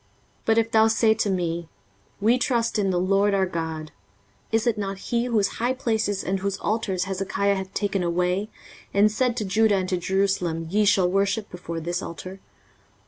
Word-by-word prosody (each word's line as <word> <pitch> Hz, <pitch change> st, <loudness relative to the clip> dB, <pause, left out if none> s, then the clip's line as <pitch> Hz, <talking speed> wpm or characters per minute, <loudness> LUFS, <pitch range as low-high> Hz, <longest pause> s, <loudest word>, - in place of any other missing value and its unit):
23:036:007 -, -, -38 dB
But 225 Hz, 0 st, +4 dB
if 225 Hz, 0 st, +2 dB
thou 220 Hz, 0 st, +5 dB
say 225 Hz, 0 st, +3 dB
to 220 Hz, -1 st, -1 dB
me, 170 Hz, -3 st, -2 dB, 0.5 s
We 230 Hz, +5 st, +3 dB
trust 235 Hz, -4 st, 0 dB
in 195 Hz, -2 st, +1 dB
the 180 Hz, -1 st, +1 dB
LORD 195 Hz, +2 st, +2 dB
our 190 Hz, -1 st, +2 dB
God: 160 Hz, -3 st, -4 dB, 0.6 s
is 225 Hz, 0 st, +1 dB
it 235 Hz, -3 st, +2 dB
not 195 Hz, -2 st, -3 dB
he, 235 Hz, +4 st, -1 dB
whose 220 Hz, -5 st, +2 dB
high 245 Hz, +3 st, +1 dB
places 220 Hz, -5 st, -1 dB
and 190 Hz, +1 st, -1 dB
whose 195 Hz, 0 st, -2 dB
altars 205 Hz, -4 st, -1 dB
Hezekiah 195 Hz, +1 st, 0 dB
hath 190 Hz, -1 st, -4 dB
taken 200 Hz, -2 st, 0 dB
away, 180 Hz, +4 st, 0 dB, 0.5 s
and 210 Hz, +1 st, +5 dB
said 240 Hz, +2 st, 0 dB
to 215 Hz, -, -1 dB
Judah 215 Hz, +2 st, +3 dB
and 185 Hz, -1 st, -1 dB
to 185 Hz, -, +1 dB
Jerusalem, 180 Hz, -3 st, 0 dB
Ye 210 Hz, +1 st, +3 dB
shall 190 Hz, -2 st, +4 dB
worship 200 Hz, +3 st, 0 dB
before 170 Hz, -2 st, -6 dB
this 175 Hz, +3 st, -3 dB
altar? 185 Hz, +3 st, -8 dB
195 Hz, 190 wpm, -24 LUFS, 185-220 Hz, 0.6 s, thou